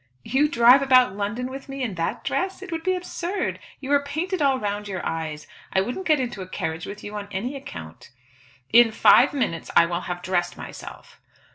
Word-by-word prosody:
"You 275 - +2
drive 245 +1 +6
about 255 -6 +4
London 210 +5 -3
with 270 +1 -9
me 270 -1 -4
in 225 -5 -2
that 165 -2 -3
dress? 380 0 -2
It 380 - -9
would 325 -1 -3
be 370 +2 +1
absurd. 360 +1 -3 0.2
You 275 0 -5
are 285 0 +4
painted 320 +6 -3
all 275 -2 +3
round 205 -1 -3
your 190 -3 -5
eyes. 155 -2 -4 0.3
I 190 - +2
wouldn't 250 - -4
get 305 -3 +4
into 240 -6 -3
a 185 - -7
carriage 160 -3 -4
with 205 +1 -8
you 205 - -7
on 205 -1 -5
any 235 +9 -3
account." 80 - -9 0.6
"In 235 -1 +7
five 245 +4 +6
minutes 210 - -2
I 170 - +7
will 170 +1 -2
have 180 -1 -5
dressed 175 -1 -1
myself." - - -10
240 Hz, 205 wpm, -24 LUFS, 185-285 Hz, 0.6 s, In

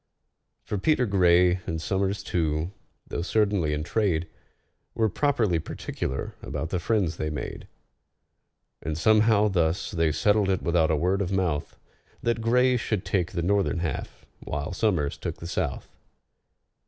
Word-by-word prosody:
For 105 - -3
PETER 130 +3 +2
GRAY, 90 -2 +4
and 80 -1 -2
SOMERS 95 +3 -1
too, 80 -1 -1 0.3
though - - -4
certainly 100 -4 +1
in 75 0 -1
trade, 85 -3 0 0.7
Were 110 -1 +2
properly 110 - +1
particular 65 -3 -4
about 80 - -4
the 90 - 0
friends 95 -4 0
they 75 - -2
made; 75 - -6 1.1
And 80 -1 -3
somehow 110 +3 +4
thus 85 -3 0
they 80 -4 +1
settled 100 +5 +2
it 95 -2 0
without 85 -1 +2
a 80 - +3
word 90 +6 +1
of 95 -1 -2
mouth— 90 -6 -1 0.5
That 115 -1 0
GRAY 125 +2 +3
should 110 -4 -2
take 90 -3 0
the 85 -2 -1
northern 100 0 +1
half, 80 -5 -4
while 75 +4 -4
SOMERS 90 -9 0
took - - -4
the - - -9
south. 75 -6 -2
90 Hz, 145 wpm, -26 LUFS, 80-105 Hz, 1.1 s, GRAY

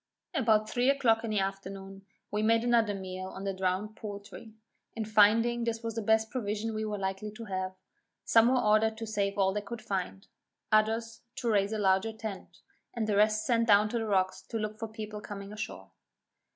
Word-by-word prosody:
About 220 -4 +3
three 245 +3 +1
o'clock 235 -5 +3
in 230 - -3
the 215 - 0
afternoon 195 0 -5 0.2
we 210 - 0
made 225 +1 +3
another 230 -4 +3
meal 185 -1 -6
on 190 +1 -8
the 195 -1 -1
drowned 190 +3 -1
poultry, 205 +1 -8 0.4
and 220 -2 -3
finding 225 +3 +4
this 230 0 -2
was 230 0 -3
the 225 - -3
best 220 +1 +2
provision 220 -2 -2
we 215 0 -2
were 210 -1 -2
likely 195 +2 -3
to 215 +2 -9
have; 185 -2 -3 0.5
some 225 0 +6
were 255 +1 +3
ordered 220 0 +3
to 225 - -5
save 200 -2 -1
all 190 -1 +3
they 210 - -1
could 235 +3 -7
find, 195 -2 -3 0.4
others 225 +1 +1
to 240 -4 -1
raise 200 -1 +2
a 220 - -1
larger 195 +2 +2
tent, 220 -3 -8 0.3
and 230 -2 -1
the 210 -1 0
rest 215 +1 +3
sent 230 -1 +2
down 210 0 +5
to 235 - -1
the 225 - -3
rocks 190 -2 +1
to 230 - -5
look 215 0 -4
for 225 - -3
people 215 -1 -7
coming 200 0 -8
ashore. 155 - -7
215 Hz, 200 wpm, -30 LUFS, 200-225 Hz, 0.5 s, some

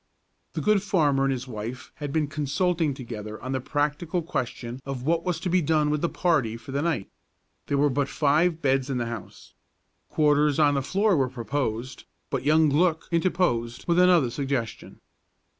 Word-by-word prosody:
The - - -3
good 210 -2 +3
farmer 150 -9 +2
and 135 - +1
his 130 0 -3
wife 115 +2 -6
had 145 -1 -5
been 155 +1 +1
consulting 155 +2 0
together 110 -4 -7
on 130 - -5
the 130 -1 -1
practical 150 +6 -1
question 125 -5 -4
of 135 -2 -5
what 165 +3 +1
was 180 -3 -1
to - - -2
be 180 +1 +3
done 150 -1 +2
with 150 -1 0
the 170 - +1
party 135 -11 +1
for 135 +4 -11
the 140 +1 -1
night. 155 -12 -1 0.6
There 140 - 0
were 145 +1 +4
but 140 0 0
five 160 +3 +2
beds 135 -1 +1
in 135 - -1
the 120 - -1
house. 115 -3 -8 0.6
Quarters 150 -1 +3
on 150 -2 +4
the 140 - +1
floor 195 +8 +2
were 135 -4 +1
proposed, 120 0 -3 0.3
but - - -1
young 155 +2 +4
Glück 160 +2 +2
interposed 165 -9 0
with 170 0 +3
another 175 -9 +5
suggestion. 135 -4 -4
145 Hz, 180 wpm, -26 LUFS, 130-165 Hz, 0.6 s, another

